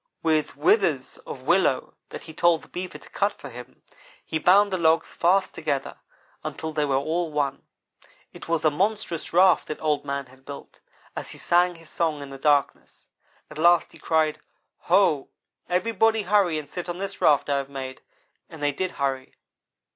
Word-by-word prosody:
With 155 -2 +1
withes 415 +4 +2
of - - -7
willow - - +2 0.2
that - - -8
he 160 - -11
told 170 0 +3
the - - -15
Beaver 180 0 -6
to - - -17
cut 205 +1 0
for - - -11
him, 125 0 -12 0.4
he 160 - -2
bound 195 +4 +5
the 185 - 0
logs 160 0 +2
fast 190 +3 +2
together 145 -4 -3 0.5
until 160 -1 -5
they 150 -1 +1
were 140 -2 0
all 160 +5 0
as 155 - -12
one. 140 -2 -1 0.7
It - - -11
was 165 -1 0
a 155 - +5
monstrous 195 0 -1
raft 180 0 +4
that 155 - -5
Old 150 -2 0
man 140 -1 -3
had 130 +1 -20
built, 140 +1 -10 0.4
as - - -6
he - - -10
sang 175 +1 +2
his 165 -1 -15
song 155 -4 -1
in 140 - -10
the 135 - -9
darkness. 145 -1 0 0.4
At 155 - -9
last 175 +2 +4
he - - -16
cried, 160 -2 +1 0.5
'Ho! - - +3 0.4
everybody 225 +3 +2
hurry 190 -4 +2
and 150 -1 -6
sit 180 -1 -6
on 175 - -3
this 195 +1 -6
raft 145 -3 +4
I 140 -1 +1
have 135 0 -3
made'; 130 -1 -7 0.5
and 160 -2 -10
they 145 - +2
did 185 +6 -3
hurry. 135 -2 -3
160 Hz, 185 wpm, -25 LUFS, 145-180 Hz, 0.7 s, bound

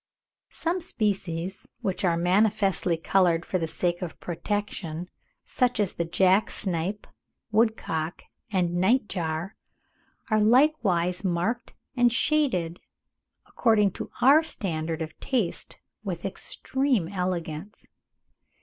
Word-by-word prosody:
Some 345 +2 -2
species, 190 - -1
which 190 -1 -2
are 170 -3 +2
manifestly 195 -1 +2
coloured 170 0 +2
for 185 - -1
the 165 - -1
sake 175 +2 -1
of 175 -3 -6
protection, 180 -2 -4 0.3
such 250 -3 0
as 205 -3 +1
the 170 - -2
jack 190 +4 +3
snipe, 185 +2 -1 0.5
woodcock, 210 -7 0 0.3
and 175 -3 +1
night 210 +6 +3
jar, 165 +1 -3 0.8
are 215 - +4
likewise 210 - +3
marked 190 +7 -1 0.2
and 245 -1 +4
shaded, 230 - +1 0.7
according 215 -4 +2
to - - -7
our 280 +5 +8
standard 165 - -3
of 160 0 -10
taste, 235 -10 -2 0.3
with 185 -5 -4
extreme 250 +2 -1
elegance. 180 -1 -4
190 Hz, 110 wpm, -26 LUFS, 170-220 Hz, 0.8 s, our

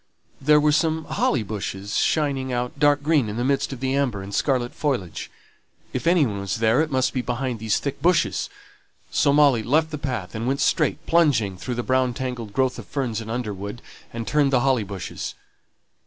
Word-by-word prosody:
There 150 +2 +5
were 150 0 +3
some 160 +1 +1
thick - - -8
holly 125 -5 +1
bushes 100 -1 -4
shining 140 -4 +1
out 125 +2 -3
dark 145 0 +4
green 145 -7 +2
in 105 - -5
the 120 - 0
midst 135 +2 0
of 130 -2 -7
the 135 0 0
amber 125 -8 0
and 100 +1 -8
scarlet 125 -2 0
foliage. 125 - -2 0.6
If - - -2
any 170 -3 +5
one 100 -4 -3
was 100 -1 -2
there, 115 +4 +3
it 160 - -1
must 130 -2 +1
be 130 - 0
behind 125 -1 -3
these 110 -1 +1
thick 140 -1 -4
bushes. 175 +1 +2 0.6
So 140 - +3
Molly 140 -5 +5
left 155 +8 +1
the 150 - -4
path, 125 -10 -4
and 110 +2 -3
went 135 +2 0
straight, - - +1
plunging 140 - +3
through 120 +7 -5
the 120 - -2
brown 130 -1 +1
tangled 125 -5 -4
growth 130 +1 0
of 105 - -10
ferns 120 -6 -2
and 110 - -8
underwood, 105 -2 -4 0.3
and 115 -1 -5
turned 145 -2 +2
the 125 -2 +3
holly 130 -4 +2
bushes. 100 -2 -6
130 Hz, 200 wpm, -23 LUFS, 110-145 Hz, 0.6 s, There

